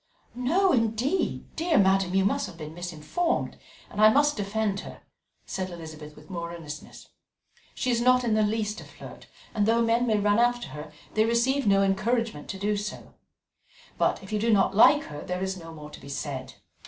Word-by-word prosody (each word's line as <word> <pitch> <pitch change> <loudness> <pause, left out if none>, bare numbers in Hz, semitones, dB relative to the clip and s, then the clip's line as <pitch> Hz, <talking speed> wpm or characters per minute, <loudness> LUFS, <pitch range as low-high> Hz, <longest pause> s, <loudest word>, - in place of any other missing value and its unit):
"No, 340 +11 +2
indeed, 235 - 0
dear 330 -2 +1
madam; 190 -1 +3
you 195 0 +3
have 195 -4 -1
been 155 -1 -8
misinformed, 175 - -2 0.3
and 210 - -4
I 215 - +9
must 290 +5 +3
defend 205 -1 -1
her," - - -10 0.4
said 185 -1 -4
Elizabeth 155 -3 -9
with - - -15
more 170 -3 -5
earnestness. 150 -3 -10 0.7
"She 255 - 0
is 235 -1 +1
not 250 +1 +4
in 230 -3 +1
the 215 - +3
least 210 0 -1
a - - -10
flirt, - - -12 0.3
and 210 -2 +1
though 230 +1 +3
men 230 +2 +2
may 215 -2 +3
run 205 +1 +2
after 240 0 +1
her, 150 +1 -8 0.2
they 215 - +3
receive 235 +3 +1
no 195 0 +5
encouragement 215 -2 0
to 195 - -4
do 205 +2 0
so. 205 +1 -6 0.9
But - - +1
if 195 - -9
you 210 - +1
do 230 +2 +2
not 195 -2 +3
like 290 +7 +7
her, 145 - -8
there 180 +1 -3
is 190 0 -2
no 165 -3 -10
more 150 -2 -10
to - - -11
be 140 - -11
said. 140 -2 -5
210 Hz, 190 wpm, -27 LUFS, 175-235 Hz, 0.9 s, I